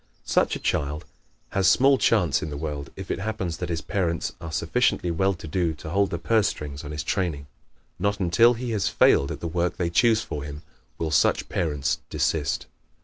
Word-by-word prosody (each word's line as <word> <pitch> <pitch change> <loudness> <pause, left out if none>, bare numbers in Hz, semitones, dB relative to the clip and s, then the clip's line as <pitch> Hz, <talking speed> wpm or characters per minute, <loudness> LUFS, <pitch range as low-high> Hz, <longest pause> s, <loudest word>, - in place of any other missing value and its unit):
Such - - +2
a - - -5
child 75 +1 -1 0.4
has 95 -1 +1
small 135 +6 +5
chance 90 -11 +3
in 80 - -4
the 75 - -5
world 75 -2 -4
if 95 -1 -6
it - - -2
happens 95 -5 -3
that 90 - -4
his 85 -2 -2
parents 85 -4 -1
are 80 -1 -6
sufficiently 85 +3 +1
well 95 +3 +1
to 80 - -10
do 85 0 0
to 80 - -8
hold 100 +1 +2
the 85 - -2
purse 110 +4 +2
strings 75 0 -5
on 75 - -7
his 75 -1 -4
training. 80 -6 -1 0.5
Not 100 +2 0
until 110 +7 +4
he 120 +1 -4
has 105 -3 0
failed 70 - +4
at - - -6
the 85 - -2
work 85 +1 -1
they 85 -2 -1
choose 110 +3 +4
for 75 - -5
him 75 +1 -8 0.3
will 80 -2 -2
such - - +2
parents 75 -5 -1
desist. - - 0
85 Hz, 205 wpm, -25 LUFS, 75-100 Hz, 0.5 s, small